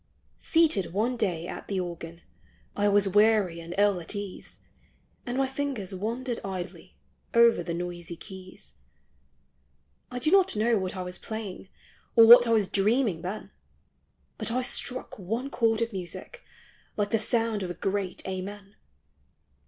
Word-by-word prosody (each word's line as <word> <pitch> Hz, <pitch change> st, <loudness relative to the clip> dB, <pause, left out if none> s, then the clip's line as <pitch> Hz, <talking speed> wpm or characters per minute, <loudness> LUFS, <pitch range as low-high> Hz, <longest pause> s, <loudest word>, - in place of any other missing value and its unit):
Seated 310 Hz, -, +2 dB
one 230 Hz, +6 st, +1 dB
day 180 Hz, -8 st, -1 dB
at -, -, -7 dB
the 195 Hz, -2 st, -1 dB
organ, 170 Hz, -1 st, -6 dB, 0.5 s
I 205 Hz, 0 st, +2 dB
was 205 Hz, -1 st, +4 dB
weary 205 Hz, -3 st, +3 dB
and 170 Hz, +1 st, -7 dB
ill 205 Hz, -2 st, +3 dB
at 170 Hz, -, -4 dB
ease, 200 Hz, -2 st, -7 dB, 0.7 s
And 245 Hz, +1 st, -2 dB
my 270 Hz, -, +3 dB
fingers 265 Hz, -8 st, -3 dB
wandered 230 Hz, +5 st, -3 dB
idly 190 Hz, -2 st, -7 dB, 0.4 s
Over 235 Hz, -5 st, +6 dB
the 170 Hz, 0 st, -3 dB
noisy 175 Hz, -1 st, -5 dB
keys. 185 Hz, -, -11 dB, 1.3 s
I 250 Hz, -, -6 dB
do 280 Hz, +6 st, +1 dB
not 385 Hz, -, +4 dB
know 220 Hz, +1 st, +2 dB
what 185 Hz, 0 st, -4 dB
I 185 Hz, -, -3 dB
was 180 Hz, 0 st, -7 dB
playing, 210 Hz, -4 st, -6 dB, 0.5 s
Or 230 Hz, -, +9 dB
what 240 Hz, +1 st, +10 dB
I -, -, +1 dB
was 215 Hz, -4 st, +3 dB
dreaming 205 Hz, -2 st, +1 dB
then, 185 Hz, +4 st, -6 dB, 0.9 s
But -, -, -1 dB
I 255 Hz, +2 st, 0 dB
struck 250 Hz, -2 st, -3 dB
one 225 Hz, +9 st, -3 dB
chord 225 Hz, -3 st, +2 dB
of 230 Hz, -1 st, -5 dB
music, 190 Hz, -, -7 dB, 0.6 s
Like 205 Hz, -1 st, 0 dB
the 225 Hz, -, +2 dB
sound 225 Hz, -1 st, +1 dB
of 185 Hz, -, -3 dB
a 175 Hz, -, -5 dB
great 195 Hz, -2 st, -3 dB
Amen. 195 Hz, +2 st, -6 dB
205 Hz, 150 wpm, -27 LUFS, 185-230 Hz, 1.3 s, what